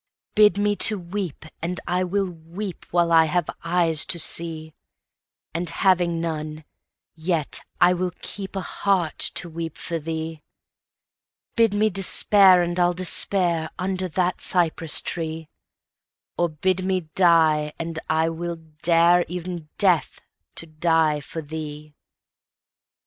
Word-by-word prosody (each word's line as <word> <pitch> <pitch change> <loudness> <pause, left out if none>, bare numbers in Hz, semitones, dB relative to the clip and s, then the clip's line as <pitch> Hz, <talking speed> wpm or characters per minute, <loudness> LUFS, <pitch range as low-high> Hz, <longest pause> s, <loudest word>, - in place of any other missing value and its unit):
Bid 210 -1 +4
me 205 0 +1
to 215 - +5
weep, 180 -3 -6 0.2
and 175 +2 -3
I 180 +1 0
will 195 +2 -1
weepWhile 175 0 -4
I 165 -1 +6
have 175 +1 -1 0.2
eyes 165 -3 +3
to 175 - +1
see; 160 -1 +1 0.8
And 170 +2 -2
having 175 -3 +1
none, 155 -1 -5 0.5
yet 160 -2 -2 0.2
I 180 +1 +5
will 180 0 -2
keepA 195 -1 -6
heart 185 -6 -1
to 175 - +2
weep 165 -1 -7
for 170 -1 -4
thee. 160 0 -6 1.1
Bid 225 -3 +2
me 215 +1 +2
despair, 195 -1 +5
and 175 +1 -3
I'll 175 0 +2
despair, 175 -2 +1
Under 185 0 -3
that 180 +2 -2
cypress 165 -3 +2
tree; 160 -2 -5 0.9
Or 175 0 0
bid 185 +4 -1
me 185 0 0
die, 160 -4 +3
and 165 -1 -5
I 160 +1 +1
will 170 +1 -5
dareE'en 170 +1 0
Death, 185 -6 +1 0.4
to - - -6
die 160 -1 +1
for 160 +3 -8
thee. 150 0 -8
170 Hz, 125 wpm, -23 LUFS, 160-185 Hz, 1.1 s, I